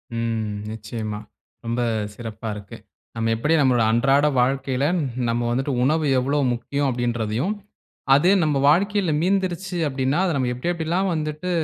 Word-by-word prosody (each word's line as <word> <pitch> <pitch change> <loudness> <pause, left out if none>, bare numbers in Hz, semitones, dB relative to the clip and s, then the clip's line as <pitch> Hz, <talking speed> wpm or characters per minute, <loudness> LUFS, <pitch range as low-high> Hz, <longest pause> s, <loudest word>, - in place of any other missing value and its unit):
ம், 115 -2 -2 0.2
நிச்சியமா. 110 -1 -5 0.5
ரொம்ப 115 +1 -1 0.3
சிறப்பா 110 -1 -6
இருக்கு. 105 -1 -9 0.4
நம்ம 115 0 0
எப்டி 150 +8 +1
நம்மளோட 125 -4 +3
அன்றாட 135 +5 +3 0.2
வாழ்க்கையில 135 +1 0 0.4
நம்ம 115 +1 0
வந்துட்டு 135 +3 -1
உணவு 155 +4 +2
எவ்வளோ 140 +3 0
முக்கியம் 140 +4 -2
அப்டின்றதையும், 120 - -1 0.6
அது 150 +6 +4
நம்ப 150 -2 +1
வாழ்க்கையில 195 +2 +2
மீந்துருச்சு 185 0 -1
அப்டின்னா, 135 +2 0
அத 175 - 0
நம்ம 130 -2 0
எப்டி 125 +8 -3
எப்டி 170 -2 -3
எல்லாம் 185 +4 +1
வந்துட்டு 155 +3 -3
135 Hz, 140 wpm, -23 LUFS, 115-160 Hz, 0.6 s, அது